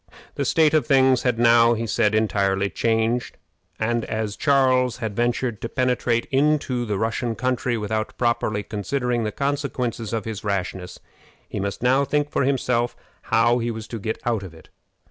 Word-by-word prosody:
The -, -, -2 dB
state 160 Hz, -2 st, +3 dB
of 155 Hz, -1 st, +2 dB
things 130 Hz, -3 st, +4 dB
had 125 Hz, -3 st, 0 dB
now, 115 Hz, 0 st, +5 dB
he 115 Hz, +1 st, -3 dB
said, 110 Hz, -1 st, +1 dB
entirely 100 Hz, -2 st, +1 dB
changed; 115 Hz, +2 st, 0 dB, 0.4 s
and 115 Hz, +1 st, 0 dB
as 110 Hz, -2 st, -3 dB
Charles 130 Hz, -3 st, +2 dB
had 110 Hz, -4 st, -4 dB
ventured 120 Hz, -1 st, -1 dB
to 115 Hz, -, -4 dB
penetrate 125 Hz, -2 st, 0 dB
into 135 Hz, -3 st, +1 dB
the 105 Hz, -3 st, -2 dB
Russian 115 Hz, +2 st, -1 dB
country 125 Hz, -1 st, -1 dB
without 110 Hz, +1 st, -3 dB
properly 115 Hz, -4 st, 0 dB
considering 120 Hz, +4 st, -2 dB
the 105 Hz, -, -2 dB
consequences 135 Hz, -5 st, -2 dB
of 115 Hz, -3 st, -2 dB
his 110 Hz, -3 st, -5 dB
rashness, 95 Hz, -3 st, -3 dB, 0.5 s
he -, -, -5 dB
must 100 Hz, +3 st, -4 dB
now 130 Hz, +3 st, +4 dB
think 145 Hz, +1 st, -1 dB
for 140 Hz, -, +1 dB
himself 125 Hz, -3 st, 0 dB, 0.3 s
how 115 Hz, +2 st, +3 dB
he 120 Hz, 0 st, -2 dB
was 110 Hz, -2 st, -6 dB
to 115 Hz, -, -5 dB
get 110 Hz, +2 st, -3 dB
out 115 Hz, -4 st, 0 dB
of 90 Hz, -4 st, -10 dB
it. 80 Hz, -, -17 dB
115 Hz, 170 wpm, -23 LUFS, 110-125 Hz, 0.5 s, now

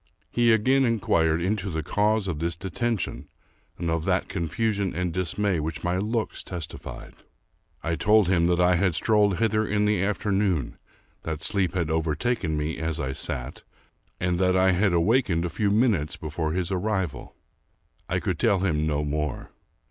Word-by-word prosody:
He 120 Hz, -1 st, +3 dB
again 130 Hz, +5 st, +3 dB
inquired 85 Hz, -8 st, +2 dB
into 100 Hz, +2 st, -1 dB
the 80 Hz, -2 st, -3 dB
cause 105 Hz, +4 st, +1 dB
of 85 Hz, -5 st, -3 dB
this 85 Hz, +1 st, -1 dB
deten 105 Hz, +6 st, -2 dB
tion, 70 Hz, -4 st, -5 dB, 0.5 s
and 85 Hz, -1 st, -2 dB
of 80 Hz, -1 st, -1 dB
that -, -, 0 dB
confusion 100 Hz, +2 st, -1 dB
and 90 Hz, -1 st, -1 dB
dismay 95 Hz, +1 st, 0 dB
which 80 Hz, +1 st, -4 dB
my 90 Hz, +1 st, 0 dB
looks 110 Hz, +2 st, -2 dB
testified. 85 Hz, -3 st, -8 dB, 0.7 s
I 80 Hz, 0 st, -1 dB
told 105 Hz, +3 st, +4 dB
him 85 Hz, -2 st, +3 dB
that 90 Hz, 0 st, +2 dB
I 90 Hz, 0 st, +4 dB
had 90 Hz, -2 st, +1 dB
strolled 105 Hz, -3 st, +3 dB
hither 110 Hz, +1 st, +2 dB
in 105 Hz, -1 st, 0 dB
the 105 Hz, -3 st, +2 dB
afternoon, 100 Hz, -, 0 dB, 0.4 s
that 80 Hz, -1 st, -4 dB
sleep 95 Hz, -3 st, 0 dB
had 85 Hz, -3 st, 0 dB
overtaken 80 Hz, +3 st, 0 dB
me 75 Hz, +2 st, -2 dB
as 80 Hz, 0 st, -2 dB
I 65 Hz, -2 st, -2 dB
sat, 65 Hz, +1 st, -4 dB, 0.6 s
and 90 Hz, -1 st, 0 dB
that 90 Hz, 0 st, +3 dB
I 95 Hz, 0 st, +4 dB
had 95 Hz, +2 st, +2 dB
awakened 85 Hz, -1 st, +2 dB
a -, -, -2 dB
few 105 Hz, +3 st, 0 dB
minutes 100 Hz, -, +1 dB
before 80 Hz, 0 st, -3 dB
his 90 Hz, 0 st, -1 dB
arrival. 95 Hz, -3 st, -2 dB, 0.7 s
I -, -, +1 dB
could -, -, -2 dB
tell 100 Hz, -, +3 dB
him 80 Hz, -5 st, +1 dB
no 75 Hz, -1 st, 0 dB
more. 75 Hz, -1 st, -3 dB
90 Hz, 170 wpm, -25 LUFS, 80-105 Hz, 0.7 s, told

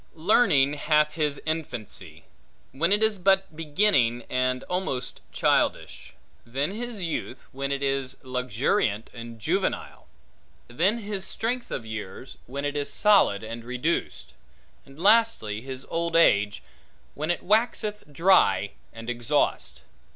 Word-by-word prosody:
Learning 155 Hz, -, +4 dB
hath 150 Hz, +1 st, +2 dB
his 150 Hz, -3 st, -1 dB
infancy, 110 Hz, -, -5 dB, 0.5 s
when 165 Hz, +7 st, 0 dB
it 210 Hz, +2 st, +4 dB
is 215 Hz, -3 st, +2 dB
but 190 Hz, -2 st, +2 dB
beginning 145 Hz, -, +2 dB
and 130 Hz, 0 st, 0 dB
almost 135 Hz, -9 st, -3 dB
childish; -, -, 0 dB, 0.3 s
then 135 Hz, +8 st, -2 dB
his 230 Hz, -3 st, -5 dB
youth, 160 Hz, -6 st, -4 dB
when 140 Hz, +1 st, -4 dB
it 140 Hz, 0 st, -2 dB
is 135 Hz, -1 st, -1 dB
luxuriant 125 Hz, -, -1 dB
and 115 Hz, -1 st, -9 dB
juvenile; 105 Hz, -, -2 dB, 0.6 s
then 175 Hz, -, +1 dB
his 205 Hz, -3 st, -5 dB
strength 240 Hz, +2 st, -2 dB
of 115 Hz, -, -4 dB
years, 110 Hz, +2 st, -7 dB
when 140 Hz, +3 st, -4 dB
it 145 Hz, 0 st, -2 dB
is 145 Hz, -1 st, -2 dB
solid 200 Hz, -, +4 dB
and 115 Hz, +1 st, -6 dB
reduced; 125 Hz, +7 st, -2 dB, 0.5 s
and 135 Hz, +1 st, -15 dB
lastly, 200 Hz, -, +3 dB
his 130 Hz, +1 st, -8 dB
old 170 Hz, 0 st, -2 dB
age, 105 Hz, -11 st, +4 dB, 0.5 s
when 155 Hz, +3 st, -4 dB
it 175 Hz, -, 0 dB
waxeth 215 Hz, 0 st, +1 dB
dry 165 Hz, -, +4 dB, 0.2 s
and 115 Hz, 0 st, -10 dB
exhaust. 120 Hz, -1 st, -1 dB
140 Hz, 130 wpm, -26 LUFS, 120-190 Hz, 0.6 s, Learning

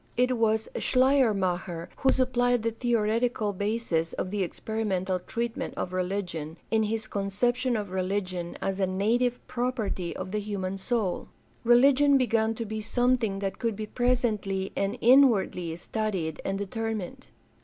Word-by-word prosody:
It 250 Hz, +1 st, +3 dB
was 220 Hz, -1 st, +1 dB
Schleiermacher 195 Hz, -10 st, +2 dB
who 265 Hz, -, +2 dB
supplied 245 Hz, -2 st, +2 dB
the 230 Hz, -, +1 dB
theoretical 225 Hz, -1 st, 0 dB
basis 200 Hz, -5 st, -1 dB
of 185 Hz, -, -3 dB
the 205 Hz, -1 st, -1 dB
experimental 190 Hz, -1 st, -2 dB
treatment 230 Hz, +5 st, -4 dB
of 185 Hz, -, -3 dB
religion 180 Hz, -4 st, -3 dB
in 220 Hz, -1 st, +3 dB
his 220 Hz, +1 st, -1 dB
con 200 Hz, -2 st, -3 dB
ception 245 Hz, +4 st, +1 dB
of 200 Hz, -3 st, -6 dB
religion 185 Hz, -2 st, -2 dB
as 195 Hz, 0 st, -1 dB
a 190 Hz, -, +2 dB
native 235 Hz, +6 st, +1 dB
property 235 Hz, -8 st, -2 dB
of 185 Hz, -, -5 dB
the 210 Hz, -, 0 dB
human 195 Hz, -2 st, -3 dB
soul. 210 Hz, -3 st, -1 dB, 0.4 s
Religion 275 Hz, +4 st, +5 dB
began 225 Hz, -3 st, +1 dB
to 230 Hz, -, -4 dB
be 220 Hz, 0 st, -4 dB
something 245 Hz, -2 st, +1 dB
that 195 Hz, -, -3 dB
could 230 Hz, -2 st, -1 dB
be 215 Hz, +1 st, -4 dB
presently 215 Hz, -6 st, 0 dB
and 200 Hz, +4 st, -1 dB
inwardly 225 Hz, -10 st, +4 dB
studied 180 Hz, -3 st, -3 dB
and 195 Hz, 0 st, -1 dB
determined. 215 Hz, -1 st, -4 dB
215 Hz, 145 wpm, -27 LUFS, 190-240 Hz, 0.4 s, Religion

